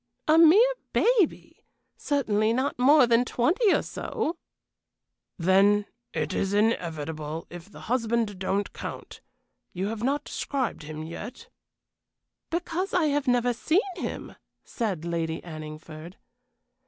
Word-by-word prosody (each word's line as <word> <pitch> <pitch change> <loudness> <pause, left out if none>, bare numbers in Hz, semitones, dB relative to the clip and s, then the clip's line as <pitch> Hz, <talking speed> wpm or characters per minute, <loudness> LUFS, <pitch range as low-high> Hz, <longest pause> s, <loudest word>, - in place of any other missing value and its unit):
"A 310 - +5
mere 405 +10 +7 0.2
baby. 455 -7 +1 0.3
Certainly 220 -6 +1
not 260 +1 -1
more 280 +2 +6
than 235 0 +3
twenty 345 - +2
or - - +2
so." 440 -8 -3 1.0
"Then 195 +4 +4 0.3
it - - -2
is 195 +1 0
inevitable, 160 -7 -1
if 175 +2 -10
the - - -12
husband 230 -4 -1
don't 195 +2 -1
count. - - -8 0.5
You 190 +3 -2
have 220 -1 -5
not 280 +4 0
described 265 -9 -3
him 155 0 -7
yet." 220 - -8 1.0
"Because 355 +3 -2
I 325 -4 +3
have 290 -1 -1
never 245 0 +2
seen 315 +9 +2 0.2
him," - - -6 0.3
said 195 -9 -3
Lady 165 -1 -2
Anningford. 155 +1 -9
225 Hz, 120 wpm, -26 LUFS, 175-290 Hz, 1.0 s, mere